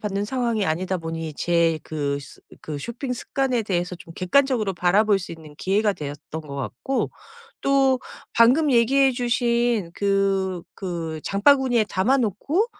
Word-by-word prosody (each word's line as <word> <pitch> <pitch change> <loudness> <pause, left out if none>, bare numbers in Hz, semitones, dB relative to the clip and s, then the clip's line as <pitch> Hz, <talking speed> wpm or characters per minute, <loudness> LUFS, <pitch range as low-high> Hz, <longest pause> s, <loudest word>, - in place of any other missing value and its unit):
받는 205 -1 -2
상황이 235 -4 0
아니다 180 +4 -1
보니 165 -1 -5
제 170 -1 +2
그 145 -2 -2
스 135 - -14 0.2
그 150 -2 -5
쇼핑 250 - -4
습관에 255 -1 -1
대해서 180 -3 -2
좀 170 -1 -13
객관적으로 225 0 +2
바라볼 195 +4 +3
수 180 - -7
있는 160 -2 -12
기회가 205 +2 +1
되었던 150 +1 -7
것 140 -2 -9
같고 140 - -2 0.5
또 270 -1 +3 0.4
방금 265 +6 +5
얘기해 265 +3 +4
주신 240 -5 +1
그 195 -2 0
그 165 -4 -4
장바구니에 245 +2 +3
담아 225 +10 +2
놓고 270 - 0
200 Hz, 290 characters per minute, -23 LUFS, 170-245 Hz, 0.5 s, 방금